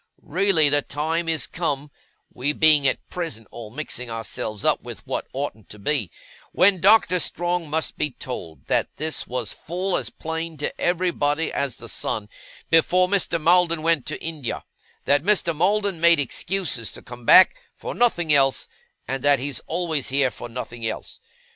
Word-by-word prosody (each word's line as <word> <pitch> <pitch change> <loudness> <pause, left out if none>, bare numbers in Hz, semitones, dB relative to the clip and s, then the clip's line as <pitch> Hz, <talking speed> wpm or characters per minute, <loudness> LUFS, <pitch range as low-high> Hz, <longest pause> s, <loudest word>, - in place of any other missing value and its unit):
Really 170 -1 +3
the 145 0 +3
time 160 +4 -2
is 160 -2 +1
come 145 -4 -3 0.4
(we 140 +4 -1
being 150 -2 +5
at - - -1
present 160 - -4
all 115 -2 -9
mixing 125 -1 -5
ourselves 115 -2 -4
up - - +3
with - - -10
what - - -3
oughtn't 130 -6 -5
to 105 - -11
be), 110 - -1 0.4
when 185 -1 +4
Doctor 195 -2 +5
Strong 175 -1 -1
must 160 +1 -2
be 150 - +2
told 85 - -8
that - - +1
this 155 -1 -2
was 120 -4 -3
full 180 +3 -3
as - - -2
plain 160 0 -5
to 145 - -4
everybody 170 -4 0
as 140 -4 -1
the - - -10
sun, 105 -1 -3 0.4
before 180 +3 +4
Mr. 185 -3 0
Maldon 170 0 +3
went 165 -4 +1
to 155 - -4
India; 155 -7 -4 0.4
that 145 0 +3
Mr. 175 -2 +2
Maldon 195 +1 +1
made 170 0 +6
excuses 145 - -1
to - - -10
come 120 0 -11
back, 185 - +7
for - - -6
nothing 175 -10 +2
else; 135 -2 +2 0.4
and 135 +1 -3
that 145 -1 +5
he's 135 +1 -3
always 160 -4 -1
here, 135 -1 +2
for 115 - -9
nothing 120 -1 -7
else. 110 - -5
155 Hz, 165 wpm, -23 LUFS, 135-175 Hz, 0.4 s, back